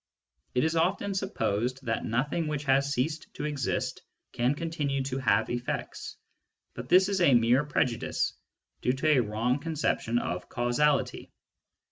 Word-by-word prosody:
It 125 - +3
is 160 +1 +1
often 195 +4 +1
supposed 130 - -1
that 115 -1 -1
nothing 145 +8 -1
which 150 -1 -2
has 140 0 +2
ceased 150 +5 -2
to - - -4
exist 145 -4 -2 0.3
can 125 +4 +1
continue 145 -4 -2
to 130 0 -3
have 110 -4 +2
effects, 120 0 -4 0.6
but 125 +2 -8
this 185 +2 +6
is 195 -2 0
a 140 -7 +6
mere 120 +4 +4
prejudice, 130 -5 0 0.5
due 125 - +2
to 150 +1 +3
a - - +4
wrong 115 +4 0
conception 145 -7 -1
of 90 -6 -3
causality. 130 +4 +1
135 Hz, 145 wpm, -28 LUFS, 120-155 Hz, 0.6 s, this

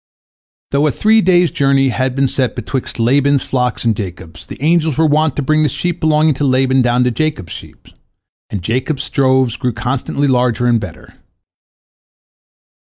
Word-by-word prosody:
Though 140 +2 +2
a - - +1
three 220 +6 +3
days' 180 -2 +3
journey 135 -1 +2
had 130 +1 -2
been 135 0 +1
set 130 -1 -2
betwixt 125 +1 -5
Laban's 140 +4 +2
flocks 125 -2 -2
and 115 -2 +2
Jacob's, 90 -4 -8
the - - -10
angels 160 0 +1
were 160 - +3
wont 155 -1 +1
to 145 - -2
bring 155 +3 +1
the 150 - +2
sheep 175 +6 -3
belonging 155 -1 +2
to - - +2
Laban 130 -1 +2
down 120 0 +2
to 125 - +1
Jacob's 140 - -3
sheep, - - -13 0.6
and 100 -4 -5
Jacob's 130 - -2
droves 130 -3 +1
grew 125 -3 -2
constantly 130 +5 -2
larger 125 -2 +1
and 120 -1 +3
better. 105 - -10
135 Hz, 170 wpm, -15 LUFS, 125-150 Hz, 0.6 s, three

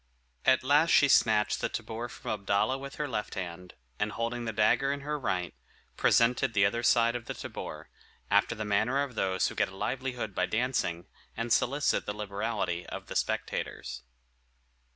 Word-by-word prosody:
At 130 - +4
last 145 +5 +4
she 140 - +6
snatched 110 -4 +3
the - - 0
tabor 115 +2 -5
from 120 - -6
Abdalla 100 +4 +1
with 140 0 -8
her 150 - -2
left 110 -5 -3
hand, 90 -1 -6 0.2
and - - -1
holding 120 +1 -2
the 110 - -1
dagger 110 +6 +3
in 140 0 -3
her 150 +1 -3
right, 90 - -2 0.4
presented 120 0 +3
the 100 -1 +5
other 115 +4 +1
side 115 -1 +4
of 120 -2 -4
the - - -5
tabor, - - -7 0.4
after 100 +4 +3
the 110 -1 -4
manner 110 +7 +2
of 140 -3 -6
those 95 -4 +1
who - - -7
get - - +1
a 95 - -12
livelihood 125 -1 -3
by - - 0
dancing, 110 -8 -1 0.3
and 115 0 +1
solicit 140 +4 +1
the 105 - -2
liberality 100 -4 -2
of - - -7
the - - -8
spectators. - - -2
115 Hz, 175 wpm, -29 LUFS, 100-130 Hz, 0.4 s, she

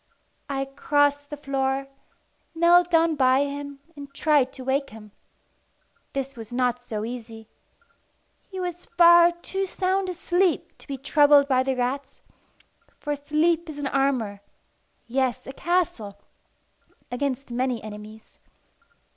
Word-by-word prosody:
I 270 -1 -1
crossed 285 +1 +1
the 295 - -6
floor, 270 -1 -1 0.7
knelt 345 +1 +5
down 330 -1 +3
by 260 -2 +3
him, 285 0 -5
and 285 -1 -10
tried 290 -4 +2
to 260 - -9
wake 275 +2 0
him. 210 -1 -13 1.0
This 275 0 -4
was 225 -2 -10
not 245 0 0
so 215 -3 -4
easy. 225 -2 -8 1.0
He 380 - -7
was 355 -1 -5
far 345 0 +7
too 385 +3 -4
sound 375 +1 -1
asleep 360 0 0
to - - -16
be 275 -2 -4
troubled 285 +1 +5
by 260 -2 +3
the 265 0 -1
rats; 265 +3 -3 0.7
for 295 0 -3
sleep 315 +4 0
is 300 - -7
an 290 - -4
armour 260 -7 0 0.6
yes, 255 0 -1
a 265 - -8
castle 270 - -1 0.9
against 270 0 -3
many 250 -2 -1
enemies. 215 +1 -11
275 Hz, 130 wpm, -25 LUFS, 250-315 Hz, 1.0 s, far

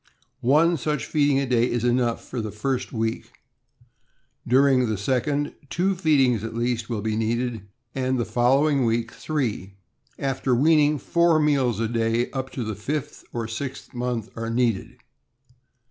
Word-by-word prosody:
One 165 +4 +4
such 150 -3 -2
feeding 145 -3 +2
a 140 - 0
day 125 -1 +2
is 120 -1 -1
enough 120 -1 +1
for 125 - -4
the 110 - -4
first 125 +5 -2
week; 115 -1 -3 1.1
during 130 -1 +4
the 110 - -1
second, 135 +7 -1 0.2
two 190 +3 +1
feedings 135 - +2
at 115 0 -5
least 120 -1 -1
will 110 -4 -3
be 110 -1 -1
needed, 115 -1 -2 0.3
and 130 -1 0
the 120 - 0
following 135 +3 +2
week 115 0 0
three. 115 -10 -3 0.4
After 135 -2 0
weaning, 150 +2 +4
four 170 +2 +2
meals 135 -7 +2
a 115 - 0
day 115 +1 0
up 130 -1 -4
to 125 - -3
the 110 -1 -3
fifth 145 +8 -5
or 115 -2 -3
sixth 130 +4 -6
month 120 -2 -3
are 115 0 -4
needed. 115 -3 0
125 Hz, 155 wpm, -24 LUFS, 115-140 Hz, 1.1 s, One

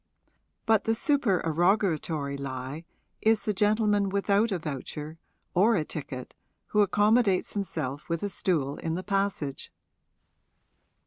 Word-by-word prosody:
But 220 -2 +3
the 225 - +2
supererogatory 175 - +1
lie 135 +3 -5 0.4
is 220 0 +2
the 210 - +1
gentleman 210 0 +2
without 200 +3 +2
a 190 - +1
voucher 155 0 -6 0.3
or 215 +6 +4
a 160 -5 0
ticket 135 -5 -6 0.4
who 210 - +3
accommodates 205 0 +3
himself 145 -9 -4
with 165 +1 -2
a 205 - -1
stool 155 -7 -1
in 165 0 -3
the 185 - -4
passage. 195 -9 -2
190 Hz, 120 wpm, -28 LUFS, 150-210 Hz, 0.4 s, or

